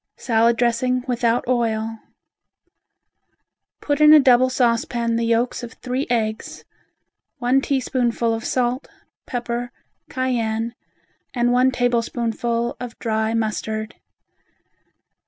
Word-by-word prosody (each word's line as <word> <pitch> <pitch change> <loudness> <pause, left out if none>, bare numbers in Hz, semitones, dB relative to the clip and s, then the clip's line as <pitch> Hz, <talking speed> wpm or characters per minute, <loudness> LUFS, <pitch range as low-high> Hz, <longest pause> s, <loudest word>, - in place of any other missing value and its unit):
Salad 230 -1 +2
Dressing 245 +1 +1
Without 240 -1 0
Oil 225 -2 -1 1.8
Put 290 0 -1
in 300 0 +8
a 310 - +9
double 255 -2 +5
saucepan 235 -1 0
the 230 0 0
yolks 235 +2 0
of 240 -2 -8
three 255 +2 -3
eggs, 220 -2 -2 0.7
one 250 +3 +2
teaspoonful 245 -4 0
of 225 0 -4
salt, 250 +1 -1 0.4
pepper, 240 0 -3 0.4
cayenne, 235 -3 -1 0.6
and 240 0 +2
one 250 +1 +4
tablespoonful 235 -1 -1
of 245 -2 -7
dry 220 -1 -1
mustard. 220 0 -2
240 Hz, 100 wpm, -21 LUFS, 230-250 Hz, 1.8 s, a